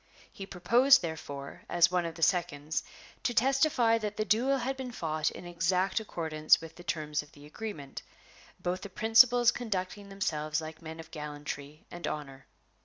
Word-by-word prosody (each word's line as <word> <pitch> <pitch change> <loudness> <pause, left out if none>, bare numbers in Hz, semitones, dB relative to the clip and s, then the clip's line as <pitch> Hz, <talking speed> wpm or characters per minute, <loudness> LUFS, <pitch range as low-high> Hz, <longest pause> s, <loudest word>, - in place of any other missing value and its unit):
He 195 - -8
proposed, 245 +9 +5
therefore, 145 -4 -6
as 175 0 +4
one 180 -1 +1
of 165 - -7
the 165 - -3
seconds, 155 -4 +1 0.4
to 240 - -1
testify 255 -2 +3
that 210 -1 -4
the 215 - 0
duel 250 +6 +2
had 265 +1 -2
been 260 -2 -6
fought 155 -6 -1
in - - -10
exact 180 +3 +1
accordance 160 -7 +2
with 165 0 -10
the 175 - -12
terms 150 -3 -2
of 150 - -18
the 145 0 -14
agreement, 150 -4 -7 0.6
both 180 +1 -2
the 200 - -7
principals 230 +3 +5
conducting 200 -3 -4
themselves 155 -6 -1
like 160 0 -8
men 160 0 -8
of 165 0 -10
gallantry 150 -1 -7
and 175 0 -5
honor 135 -3 -6
175 Hz, 170 wpm, -30 LUFS, 155-220 Hz, 0.6 s, proposed